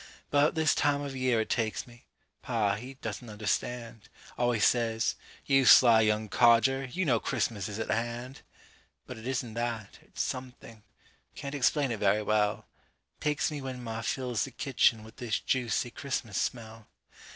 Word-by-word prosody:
'Bout 145 +2 +3
this 160 -1 +3
time 145 0 +1
of 140 -2 -5
year 130 -3 +1
it - - -5
takes 110 -3 -1
me 120 -1 -18 0.3
Pa, 110 -5 0
he 125 +6 -7
doesn't 125 -2 -6
understand, 115 +2 -3 0.3
Always 120 -3 +2
says: 115 -2 +1 0.3
"You 135 -1 +4
sly 115 0 +8
young 110 0 +1
codger, 120 +5 +4
You 175 +9 -2
know 120 -6 +3
Christmas 105 -3 -2
is 105 - -6
at 110 - -3
hand." 120 +3 -3 0.6
But 125 - -8
it 110 - -8
isn't 125 -3 -2
that, 115 -3 -4
it's - - -4
something 125 -3 -7 0.5
Can't 140 0 -6
explain 140 0 +1
it 110 - -3
very 105 +1 +2
well 105 -1 +1 0.5
Takes 150 0 0
me 145 -2 -5
when 130 -2 -6
ma 115 -1 -4
fills 125 0 -1
the - - -5
kitchen 120 -4 +1
With 110 0 -14
this 120 -4 -2
juicy 120 -2 -1
Christmas 120 -7 -4
smell. 110 -3 -4
120 Hz, 165 wpm, -29 LUFS, 110-130 Hz, 0.6 s, sly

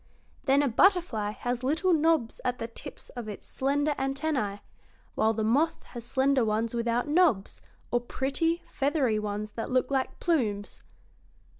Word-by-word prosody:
Then 275 +1 +4
a - - +2
butterfly 265 - +3
has 245 +3 -3
little 320 +7 +2
knobs 315 -7 +2
at 250 0 -1
the 230 - -4
tips 230 - -10
of 240 -4 -7
its 205 - -8
slender 285 +3 0
antennæ, 270 -7 -1 0.5
while 220 - +2
the 220 0 -2
moth 280 +9 +1
has 240 -2 -9
slender 265 +1 +2
ones 220 +1 0
without 235 +2 0
knobs, 295 - +2 0.3
or 240 - +2
pretty, 305 +7 -1
feathery 275 -6 0
ones 210 0 -4
that 225 - -5
look 255 +2 +1
like 265 -1 -1
plumes." 220 - -1
255 Hz, 150 wpm, -28 LUFS, 225-290 Hz, 0.5 s, Then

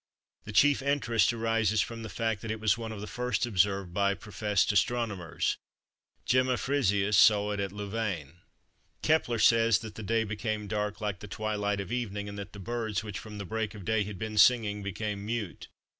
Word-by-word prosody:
The - - -6
chief 145 -1 +4
interest 135 -7 +2
arises 115 -2 +1
from 115 +2 -2
the 110 - -6
fact 110 +1 -2
that 110 - -6
it 110 0 -2
was 110 -2 +3
one 115 -1 -6
of 105 -2 -7
the - - -4
first 125 +3 -1
observed 95 -4 +1
by 100 +1 +2
professed 105 +1 0
astronomers: 105 -5 0 0.7
Gemma 130 0 +3
Frisius 105 -7 +1
saw 105 +2 +5
it 105 - -2
at 100 -1 -2
Louvain. 100 -7 -4 0.7
Kepler 155 -7 +2
says 115 -1 +5
that 110 +1 -8
the 110 - -8
day 115 +2 +1
became 110 0 -3
dark 105 +1 -2
like 105 -2 -2
the 105 - -9
twilight 105 -1 -2
of 100 -2 -5
evening 105 -4 -3
and 100 0 -7
that 100 0 -8
the - - -9
birds 110 0 -2
which 105 -3 -5
from 105 -1 -9
the 100 - -5
break 110 +1 -3
of 100 -4 -9
day 110 -1 +2
had 100 -1 -7
been 110 +2 -2
singing 105 -2 +4
became 100 +1 -4
mute. 110 -3 -4
105 Hz, 190 wpm, -29 LUFS, 100-115 Hz, 0.7 s, saw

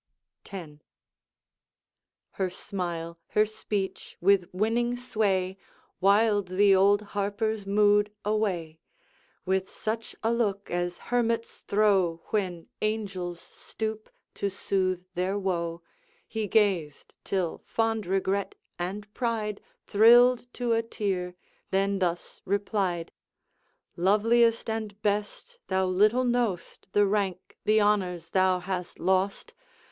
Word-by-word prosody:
X. 185 -4 -6 1.6
Her 190 -1 -1
smile, 175 -3 -5 0.2
her 210 - +6
speech, 210 -2 -4
with 190 -1 +3
winning 235 +5 0
sway 195 -6 0 0.4
Wiled 205 +1 +3
the 195 +2 +4
old 200 +2 +4
Harper's 205 +1 -1
mood 205 0 +4
away. 185 -7 -1 0.7
With 190 0 0
such 220 +1 -4
a 225 +1 +2
look 205 -4 -1
as 175 0 -1
hermits 230 -1 0
throw, 195 -5 +2
When 180 -6 -1 0.2
angels 195 -5 -2
stoop 220 -1 -6 0.2
to 200 - -2
soothe 185 -2 -1
their 185 +3 -1
woe 170 -3 -2 0.4
He 220 -1 -3
gazed, 190 -9 +1
till 185 -4 -1
fond 225 -3 0
regret 195 +1 0 0.2
and 205 +4 -5
pride 220 -4 -2 0.2
Thrilled 240 +3 +6
to 240 -2 0
a 225 - +3
tear, 190 -5 -3 0.3
then 195 +1 +1
thus 175 -2 -2
replied: 195 -4 -1 0.8
'Loveliest 225 +5 +3
and 220 -2 -4
best! 210 - -2
thou 190 0 +1
little 210 +7 +3
know'st 240 -7 -1
The 205 0 +4
rank, 195 -3 -2
the 215 +1 +4
honors, 180 -5 +1
thou 185 -1 +3
hast 180 -1 -4
lost! 190 - 0
200 Hz, 110 wpm, -27 LUFS, 185-215 Hz, 1.6 s, her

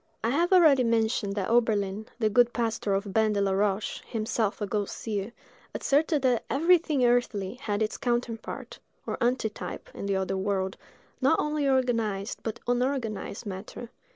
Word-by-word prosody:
I 230 - +1
have 340 +7 +1
already 315 -8 +6
mentioned 225 -3 +1
that 200 +1 -2
Oberlin, 215 -3 +1
the 225 -3 +2
good 240 +2 +4
pastor 225 -4 0
of 200 0 -3
Ban 220 0 +3
de 205 - 0
la 195 -1 +1
Roche, 200 +1 0
himself 220 -2 -1
a 210 - -1
ghost 205 0 -2
seer, 210 -1 -3 0.4
asserted 290 0 +1
that 250 -3 +2
everything 310 -3 +3
earthly 240 -5 +1
had 220 -4 -2
its 215 - -2
counterpart, 240 -2 -3 0.3
or - - -4
antitype, 235 -3 -2
in 200 - -5
the 200 - +1
other 190 0 -1
world, 190 -1 -1 0.5
not 275 +5 +4
only 300 -2 0
organized, 230 -6 0
but 225 - -4
unorganized 245 -4 -1
matter. 205 +4 -7
225 Hz, 155 wpm, -27 LUFS, 205-250 Hz, 0.5 s, already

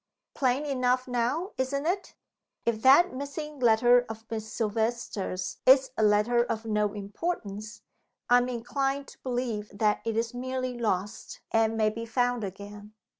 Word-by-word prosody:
"Plain 265 +1 +1
enough 255 -2 +1
now 250 - -1
isn't 280 +2 -1
it? 375 +3 -2 0.5
If 225 -2 0
that 275 +7 +6
missing 285 +2 -6
letter 240 +1 +5
of 225 0 -8
Miss 220 -1 -4
Silvester's 220 -4 -2
is 260 0 +6
a - - -1
letter 215 +3 +4
of 230 -2 -4
no 210 -2 0
importance, 210 - -5 0.4
I 245 0 +6
am 245 +1 -1
inclined 270 +3 -2
to - - -16
believe 240 -5 -3
that 210 +1 +1
it 225 -1 -2
is 230 +1 -1
merely 255 0 -3
lost, 210 -3 -3
and 225 0 +2
may 215 -1 +2
be 230 +1 -6
found 245 0 0
again. 205 +2 -8
235 Hz, 150 wpm, -28 LUFS, 215-255 Hz, 0.5 s, that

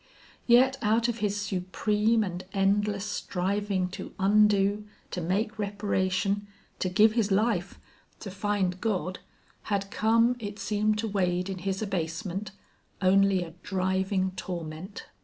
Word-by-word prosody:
Yet 260 +3 +5
out 225 +2 +2
of 235 0 -3
his 205 -1 0
supreme 210 +3 +1
and 180 -2 -5
endless 200 +1 +1
striving 195 -1 -1
to 185 - -8
undo, 205 +1 +3 0.2
to 180 - -3
make 210 +6 -1
reparation, 200 0 0 0.3
to 185 - 0
give 210 +4 +5
his 220 -2 +1
life, 215 +5 +1 0.4
to 195 - -6
find 195 -2 -1
God, 185 -4 -1 0.5
had 200 -1 -1
come, 230 +3 +3
it 205 -2 -6
seemed 210 +1 0
to 225 +1 -2
Wade 180 -2 0
in 190 - -5
his 195 +3 -2
abasement, 190 +1 -3 0.5
only 195 0 +4
a 165 - -9
driving 190 0 0
torment. 175 +1 -6
200 Hz, 130 wpm, -28 LUFS, 185-210 Hz, 0.5 s, Yet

